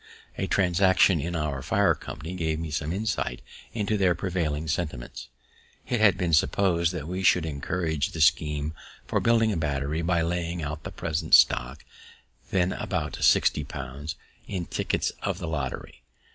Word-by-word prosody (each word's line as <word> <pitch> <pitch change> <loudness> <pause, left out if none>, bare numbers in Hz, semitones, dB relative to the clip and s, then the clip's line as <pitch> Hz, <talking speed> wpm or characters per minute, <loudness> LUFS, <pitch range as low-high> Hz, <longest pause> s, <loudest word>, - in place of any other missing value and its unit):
A - - -2
transaction 95 -1 +3
in 85 +3 -3
our 75 -4 -2
fire - - +3
company 80 +4 -8
gave 80 -3 -1
me 80 -1 -5
some 75 +2 -2
insight 95 - -2 0.3
into 105 -1 -1
their 90 -3 +3
prevailing 80 -5 -2
sentiments. 75 -6 -4 0.6
It 120 - 0
had 105 -4 +5
been 85 -2 -1
propos'd 85 +1 +2
that 80 -4 -5
we 90 +2 -3
should 90 -3 +4
encourage 80 +1 -2
the 80 - -7
scheme 75 -2 +2 0.3
for - - 0
building 115 -1 +3
a 100 - -1
battery 75 0 -1
by 85 0 +1
laying 85 0 -2
out 75 +1 -5
the - - -5
present 80 0 +2
stock, 65 +4 +3 0.6
then 90 0 +1
about - - -3
sixty 75 - +4
pounds, 70 +2 -6 0.3
in 90 -3 -3
tickets - - -1
of - - -2
the 85 - -5
lottery. 70 -5 -4
80 Hz, 160 wpm, -26 LUFS, 75-90 Hz, 0.6 s, had